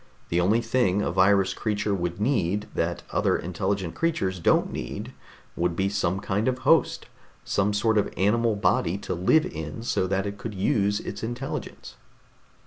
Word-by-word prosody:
The 85 +1 +2
only 105 +6 +3
thing 115 -4 +1
a - - -1
virus 95 +1 +3
creature 105 -1 -1
would 90 -1 -2
need 105 -4 0
that - - -2
other - - +2
intelligent 95 +1 -2
creatures 95 - -1
don't 85 - +2
need - - -5 0.4
would 85 0 0
be 95 +2 +1
some 95 -2 0
kind 105 +3 -1
of 130 -1 +1
a - - -15
host, - - +3 0.4
some 100 +1 +1
sort 110 +1 +2
of - - -1
animal 110 +3 +2
body 90 -2 +1
to - - -4
live 95 - +3
in 80 +7 -6
so 95 -5 0
that 95 +1 0
it 100 0 -5
could 110 -3 -6
use 100 +1 +1
its 100 - -6
intelligence." 120 +4 -6
100 Hz, 170 wpm, -26 LUFS, 95-110 Hz, 0.4 s, only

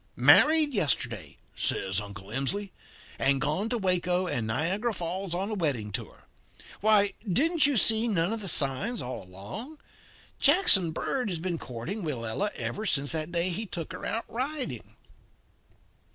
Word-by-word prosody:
"'Married 310 -2 +5
yesterday,' 130 - 0 0.2
says 95 +1 -1
Uncle 100 -1 -10
Emsley, 190 - -2 0.5
'and 135 0 +2
gone 155 +11 -1
to 245 - -1
Waco 180 -2 +1
and 120 -10 -2
Niagara 185 - -1
Falls 180 +1 -3
on 195 +4 -2
a - - -2
wedding 140 - -1
tour. - - -6 0.6
Why, 205 -1 +4 0.2
didn't 305 - +3
you 285 -3 +1
see 220 +2 +4
none 190 -2 0
of 225 - -4
the 195 - -1
signs 155 - +1
all 125 0 -5
along? 100 - -8 0.6
Jackson 195 - +5
Bird 245 +8 -2
has 175 - -2
been 170 0 -3
courting 125 - -6
Willella 145 - -2
ever 215 - -4
since 140 -5 0
that 160 0 -1
day 175 +1 +2
he 210 +5 -3
took 170 -3 -5
her - - -8
out 225 - -2
riding.' 265 +3 -5
180 Hz, 150 wpm, -28 LUFS, 140-220 Hz, 0.6 s, Married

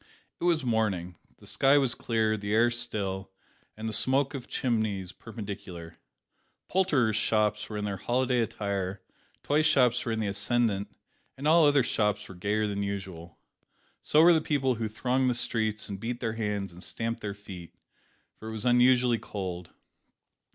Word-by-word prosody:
It - - -2
was 165 -5 +2
morning. 105 -7 0 0.2
The - - -17
sky 140 +1 +3
was 135 -4 +2
clear, 110 -2 0
the 105 0 -2
air 120 +2 +4
still, 100 -5 -2 0.5
and 110 +1 -5
the 110 - -3
smoke 135 +6 +2
of 135 -3 -6
chimneys 110 -7 -1
perpendicular. 100 -7 -8 0.7
Poulterers' 145 - +2
shops 105 -1 +1
were 105 - -4
in 105 - -2
their 100 -1 -3
holiday 125 +4 0
attire; 100 -3 -3 0.4
toy 150 +2 +2
shops 130 -6 +3
were 115 - -2
in 110 - -1
the 110 - -1
ascendant, 100 0 +1 0.5
and 140 +3 -2
all 160 0 +6
other 145 -2 +4
shops 105 -3 0
were - - -10
gayer 105 +4 -1
than 100 -1 -2
usual. 95 -4 -6 0.6
So 155 +2 +4
were 175 +1 +8
the 160 - +3
people 135 -4 +1
who 110 - 0
thronged 130 +4 0
the 125 - 0
streets 110 -2 0
and 100 -2 -6
beat 120 +3 -4
their 115 -3 -2
hands 105 -4 -3
and 90 +2 -11
stamped 115 0 -3
their 100 -1 -4
feet 95 -4 -11 0.6
for 110 - -9
it - - -5
was 110 +1 -5
unusually 125 -1 +4
cold. 90 -5 -6
110 Hz, 170 wpm, -28 LUFS, 100-125 Hz, 0.7 s, were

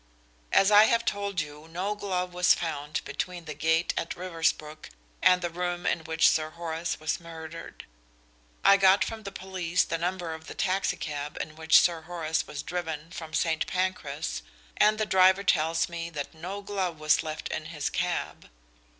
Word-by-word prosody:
As 195 +2 +5
I 210 +1 +9
have 235 +1 +2
told 200 -3 -1
you 150 +1 -9
no 180 +5 -2
glove 185 -3 -3
was 180 0 +5
found 150 -2 -3
between 180 -2 -4
the 150 - -5
gate 160 +3 +1
at 165 - -3
Riversbrook 160 -3 -2 0.3
and 180 0 +5
the 175 - 0
room 175 0 -3
in 160 - 0
which 160 0 +4
Sir 155 -1 +2
Horace 165 0 -4
was 155 0 -1
murdered. 165 -1 -9 0.8
I 200 - +8
got 195 0 +5
from 225 -1 -6
the 200 -2 -7
police 185 -2 -1
the 165 - -3
number 175 -1 -2
of 160 0 -10
the - - -8
taxi 190 0 0
cab 145 -1 -5
in 155 - -5
which 160 0 +6
Sir 170 -2 +2
Horace 160 -1 -2
was 145 0 -6
driven 160 -1 -4
from 160 -2 -7
St. 160 -2 +1
Pancras, 180 -5 -2 0.3
and 215 +1 +4
the 215 - 0
driver 190 0 +5
tells 165 -2 +2
me 170 -1 -5
that 150 -2 -5
no 185 +5 -6
glove 190 -5 -2
was 155 0 +3
left 155 -1 -5
in 155 - -4
his 155 -3 -3
cab. 180 -1 -2
170 Hz, 175 wpm, -28 LUFS, 160-185 Hz, 0.8 s, I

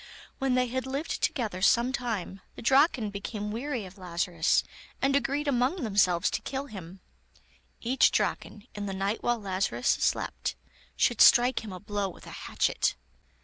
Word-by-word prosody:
When 270 -2 +1
they 255 0 +3
had 260 +2 -3
lived 275 +4 -3
together 215 -8 -1
some 235 +5 +4
time, 220 -7 -3
the - - -9
Draken 265 -4 +3
became 205 +1 -5
weary 245 -1 -3
of 190 +2 -13
Lazarus, 175 -1 +1 0.4
and 275 +1 +2
agreed 285 +1 0
among 270 +5 +1
themselves 190 -5 +2
to - - -2
kill 270 +1 -4
him; 190 -6 -10 0.8
each 255 +3 +4
Draken, 210 0 -2
in 205 -1 -5
the 195 - -4
night 195 +3 -1
while 240 -1 0
Lazarus 185 - -1
slept, 60 - 0 0.4
should 240 - +2
strike 245 +1 +6
him 215 - -7
a 185 - -7
blow 205 -1 -2
with 175 - -13
a - - -10
hatchet. - - 0
220 Hz, 160 wpm, -28 LUFS, 195-260 Hz, 0.8 s, strike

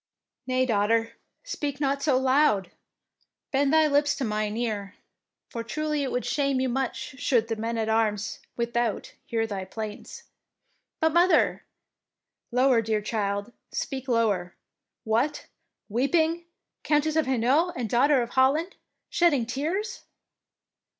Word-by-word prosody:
" 260 - -57
"Nay, 255 0 +2
daughter, 225 0 +1 0.3
speak 290 - -4
not 280 -1 0
so 280 -3 +3
loud, 260 - +3 0.8
bend 275 0 +2
thy 315 0 +5
lips 290 0 +2
to 275 - -3
mine 215 -1 -1
ear, 210 -4 -3 0.5
for 230 - -5
truly 305 +4 -2
it 270 - -2
would 250 - -2
shame 275 -3 +1
you 260 0 0
much 265 +2 -3
should 235 -5 +2
the 225 - 0
men 230 +1 -3
at 220 -1 -1
arms 220 -1 0 0.2
without 235 -2 -1
hear 225 -1 0
thy 200 -3 -4
plaints." 210 +2 -7 0.4
" - - -48
But, 320 -1 +2
mother 350 +2 +3 0.2
— - - -63
" - - -58
"Lower, 250 -1 +4
dear 215 -1 -1
child, 205 0 -2 0.2
speak 265 -1 -4
lower. 210 -7 +1 0.5
What! 240 +7 0 0.4
weeping? 320 +9 +1 0.4
Countess 300 +1 +1
of 315 -4 +2
Hainault 265 +8 +2
and 245 -3 -2
Daughter 255 +3 +3
of 235 - -7
Holland 285 +8 +2 0.3
shedding 300 -9 +2
tears? 325 - -3
255 Hz, 145 wpm, -26 LUFS, 225-290 Hz, 0.8 s, thy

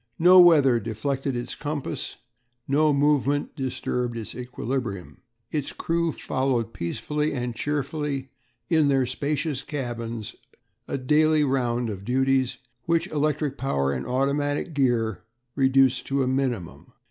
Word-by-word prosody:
No 180 +2 +7
weather 145 -8 +6
deflected 130 +5 -2
its 120 - -4
compass, 150 -2 -4 0.5
no 150 +2 +3
movement 145 0 +1
disturbed 125 -2 -2
its 110 - -6
equilibrium. 125 -5 -4 0.3
Its 150 -3 -2
crew 170 0 -1
followed 130 -5 -1
peacefully 150 - -2
and 120 -2 -3
cheerfully 145 0 -2 0.4
in 160 -4 +3
their 135 -2 +3
spacious 140 +2 -2
cabins 120 -6 -5 0.5
a - - -2
daily 150 +3 +3
round 125 -4 0
of 100 -1 -7
duties 130 +2 +1 0.3
which 165 0 +2
electric 150 -2 -1
power 70 - 0
and 65 -1 -4
automatic 145 +4 0
gear 120 - +1 0.3
reduced 135 -1 +3
to 135 0 +1
a - - -1
minimum. 130 -9 -2
135 Hz, 125 wpm, -25 LUFS, 120-145 Hz, 0.5 s, No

